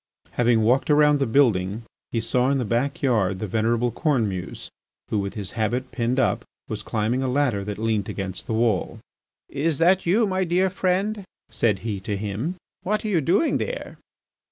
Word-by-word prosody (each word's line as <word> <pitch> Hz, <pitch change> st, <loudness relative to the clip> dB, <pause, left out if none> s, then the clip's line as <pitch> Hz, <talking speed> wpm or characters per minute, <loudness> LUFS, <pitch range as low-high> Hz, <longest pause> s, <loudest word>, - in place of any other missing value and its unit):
Having 120 Hz, -2 st, +3 dB
walked 125 Hz, +7 st, +2 dB
around 150 Hz, -1 st, +5 dB
the 135 Hz, -, +1 dB
building 110 Hz, -5 st, +2 dB, 0.3 s
he 115 Hz, -, 0 dB
saw 125 Hz, +3 st, +1 dB
in 140 Hz, -, +2 dB
the 125 Hz, -, -1 dB
backyard 115 Hz, -5 st, +1 dB
the 110 Hz, -, -3 dB
venerable 115 Hz, +4 st, +1 dB
Cornemuse, 110 Hz, -, -1 dB, 0.4 s
who, 105 Hz, -, 0 dB
with 100 Hz, 0 st, -3 dB
his 100 Hz, -4 st, -4 dB
habit 120 Hz, +4 st, -2 dB
pinned 125 Hz, +2 st, 0 dB
up, 130 Hz, -, +1 dB, 0.2 s
was -, -, -4 dB
climbing 115 Hz, +4 st, -1 dB
a 130 Hz, -, 0 dB
ladder 125 Hz, -6 st, +1 dB
that 105 Hz, 0 st, -5 dB
leant 110 Hz, -2 st, -1 dB
against 95 Hz, -2 st, -5 dB
the -, -, -2 dB
wall. 110 Hz, -5 st, +1 dB, 0.5 s
"Is 150 Hz, +1 st, -1 dB
that 180 Hz, +2 st, +3 dB
you, 215 Hz, +6 st, +4 dB
my 190 Hz, -1 st, 0 dB
dear 185 Hz, +2 st, +1 dB
friend?" 195 Hz, +3 st, 0 dB, 0.3 s
said 105 Hz, -5 st, +1 dB
he 105 Hz, -4 st, -2 dB
to 100 Hz, +1 st, -3 dB
him. 105 Hz, -, -3 dB, 0.3 s
"What 210 Hz, +4 st, -1 dB
are -, -, -1 dB
you 175 Hz, -6 st, +2 dB
doing 190 Hz, -, +2 dB
there?" -, -, -5 dB
120 Hz, 180 wpm, -24 LUFS, 110-150 Hz, 0.5 s, around